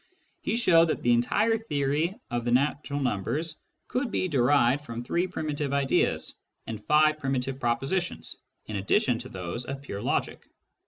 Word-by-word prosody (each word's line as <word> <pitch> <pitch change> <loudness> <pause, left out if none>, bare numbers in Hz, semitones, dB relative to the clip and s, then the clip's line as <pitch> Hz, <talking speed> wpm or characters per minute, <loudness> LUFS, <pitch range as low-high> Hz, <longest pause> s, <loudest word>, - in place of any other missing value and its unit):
He - - -1
showed 170 -9 +5
that - - -2
the 120 - +4
entire 210 - +2
theory 155 - -1
of 120 -1 -1
the 120 - -1
natural 140 +3 +1
numbers 130 - -1 0.3
could 250 0 -1
be 185 - 0
derived 140 -2 +3
from 115 -3 -6
three 175 +8 0
primitive 150 -5 -3
ideas 140 -1 +1 0.3
and 110 -2 -6
five 155 +2 +4
primitive 135 -2 -2
propositions 135 +10 -1 0.3
in 110 - -4
addition 120 - +2
to - - -8
those 95 +6 -5
of 135 +2 -6
pure 100 -7 -5
logic. - - -2
140 Hz, 155 wpm, -27 LUFS, 120-160 Hz, 0.3 s, showed